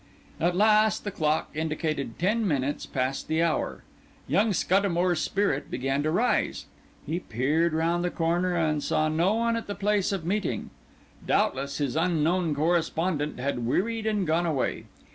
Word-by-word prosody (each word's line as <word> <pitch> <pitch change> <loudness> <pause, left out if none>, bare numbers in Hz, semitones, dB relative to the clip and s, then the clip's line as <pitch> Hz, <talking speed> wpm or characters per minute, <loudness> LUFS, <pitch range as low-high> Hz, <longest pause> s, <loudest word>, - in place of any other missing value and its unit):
At 175 +2 +1
last 215 0 +4
the 205 - -3
clock 155 -3 0
indicated 155 -5 -2
ten 210 +5 +1
minutes 145 -3 -1
past 130 0 -2
the 160 +1 +1
hour. 165 -2 -1 0.4
Young 200 - +2
Scuddamore's 180 -3 +1
spirit 195 -8 0
began 135 +2 -1
to 155 - 0
rise; 220 +10 0 0.4
he 170 - -2
peered 155 +5 0
round 165 +2 +1
the 180 - +1
corner 175 +2 0
and 155 -3 +1
saw 155 +2 +1
no 170 +7 +2
one 230 0 +1
at 230 - -4
the 205 - -4
place 205 -1 +1
of 190 -5 -3
meeting; 185 - -2 0.6
doubtless 140 +1 0
his 140 -3 -1
unknown 165 0 +1
correspondent 160 -1 0
had 125 -2 -2
wearied 220 - 0
and 210 -3 0
gone 165 +2 +1
away. 145 -5 -1
165 Hz, 155 wpm, -27 LUFS, 150-190 Hz, 0.6 s, last